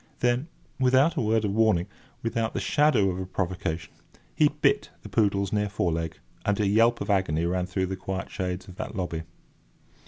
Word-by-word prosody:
Then, 125 Hz, +4 st, +2 dB, 0.3 s
without 130 Hz, +5 st, +4 dB
a -, -, 0 dB
word 110 Hz, 0 st, +2 dB
of 100 Hz, -, -1 dB
warning, 110 Hz, -5 st, +3 dB, 0.4 s
without 115 Hz, -1 st, -1 dB
the -, -, +1 dB
shadow 125 Hz, -10 st, +3 dB
of 90 Hz, -, -4 dB
a 95 Hz, -, -3 dB
provocation, 90 Hz, -3 st, -3 dB, 0.4 s
he -, -, +5 dB
bit -, -, +1 dB
that -, -, -8 dB
poodle's 100 Hz, -2 st, +1 dB
near 105 Hz, -1 st, +1 dB
fore 90 Hz, -4 st, 0 dB
leg, 80 Hz, 0 st, -3 dB, 0.3 s
and 105 Hz, 0 st, 0 dB
a 105 Hz, -, +2 dB
yelp 115 Hz, +4 st, +3 dB
of -, -, -1 dB
agony 85 Hz, -5 st, +1 dB
rang 90 Hz, +1 st, 0 dB
through 95 Hz, 0 st, -1 dB
the 95 Hz, +1 st, -3 dB
quiet 95 Hz, 0 st, -5 dB
shades 90 Hz, +1 st, -3 dB
of 90 Hz, -1 st, -12 dB
that 110 Hz, -, -5 dB
lobby. 85 Hz, -4 st, -2 dB
100 Hz, 190 wpm, -27 LUFS, 90-110 Hz, 0.4 s, he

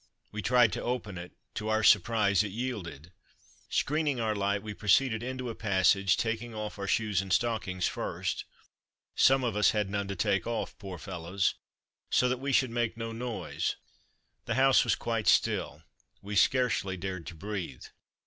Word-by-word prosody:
We 105 Hz, -, -4 dB
tried 120 Hz, -3 st, +4 dB
to -, -, -3 dB
open 115 Hz, -7 st, -3 dB
it: 90 Hz, +1 st, -9 dB, 0.2 s
to 110 Hz, 0 st, -4 dB
our 110 Hz, 0 st, +1 dB
surprise 105 Hz, -2 st, +4 dB
it 105 Hz, -2 st, -3 dB
yielded. 95 Hz, -, -5 dB, 0.6 s
Screening 150 Hz, -3 st, 0 dB
our 110 Hz, -2 st, 0 dB
light 100 Hz, 0 st, 0 dB
we 105 Hz, -1 st, -5 dB
proceeded 110 Hz, +3 st, +2 dB
into 130 Hz, +1 st, -4 dB
a 115 Hz, -, -3 dB
passage, 100 Hz, -2 st, +2 dB
taking 115 Hz, 0 st, -2 dB
off 105 Hz, -1 st, -5 dB
our 100 Hz, -, -3 dB
shoes 105 Hz, -3 st, +1 dB
and 95 Hz, -1 st, -7 dB
stockings 100 Hz, -5 st, 0 dB
first -, -, -3 dB, 0.7 s
(some 135 Hz, 0 st, +4 dB
of 120 Hz, -3 st, -1 dB
us 105 Hz, -1 st, +4 dB
had 105 Hz, -2 st, 0 dB
none 100 Hz, -1 st, -2 dB
to 100 Hz, -, -4 dB
take 95 Hz, +2 st, 0 dB
off, 115 Hz, -1 st, -3 dB
poor 95 Hz, -3 st, -7 dB
fellows!) 95 Hz, -1 st, -2 dB, 0.6 s
so 125 Hz, -, +3 dB
that 125 Hz, 0 st, -1 dB
we 140 Hz, +1 st, -2 dB
should 130 Hz, -2 st, +3 dB
make 120 Hz, -1 st, -1 dB
no 115 Hz, 0 st, -4 dB
noise. 120 Hz, 0 st, -3 dB, 0.7 s
The 115 Hz, -, -1 dB
house 135 Hz, 0 st, +5 dB
was -, -, +2 dB
quite 115 Hz, -2 st, -2 dB
still; 75 Hz, +2 st, +2 dB, 0.4 s
we 105 Hz, +1 st, -6 dB
scarcely 105 Hz, -3 st, +2 dB
dared 90 Hz, -2 st, -5 dB
to 85 Hz, -, -7 dB
breathe. 90 Hz, -6 st, -5 dB
105 Hz, 170 wpm, -29 LUFS, 95-120 Hz, 0.7 s, house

